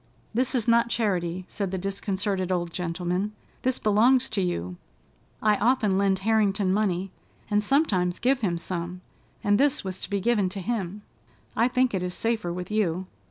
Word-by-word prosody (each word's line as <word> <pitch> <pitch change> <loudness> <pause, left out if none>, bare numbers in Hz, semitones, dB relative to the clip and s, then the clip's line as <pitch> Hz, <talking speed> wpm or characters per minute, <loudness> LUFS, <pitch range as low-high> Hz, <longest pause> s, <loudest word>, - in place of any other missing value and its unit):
"This 255 +3 +1
is 240 -3 0
not 235 0 +4
charity," 185 -6 -1
said 200 -3 -3
the 190 - -3
disconcerted 195 0 -2
old 175 -2 -1
gentleman. 180 +3 -2 0.3
"This 255 0 +1
belongs 235 +5 +4
to 200 - 0
you. 90 - -2 0.7
I 210 -1 +4
often 215 -2 +2
lend 195 0 +2
Harrington 205 -3 +2
money, 195 -2 0 0.4
and 210 0 +3
sometimes 200 - +2
give 255 +1 +1
him 180 -6 0
some, 175 +1 -5 0.4
and 205 0 +3
this 285 -1 +2
was 190 -1 -4
to - - -6
be 200 -1 0
given 205 -2 +2
to 195 +2 -5
him. 205 -1 -3 0.5
I 230 - +4
think 255 -1 +1
it 190 - 0
is 180 0 -3
safer 225 -6 -1
with 180 +3 -5
you. 190 -4 0
200 Hz, 170 wpm, -26 LUFS, 180-225 Hz, 0.7 s, not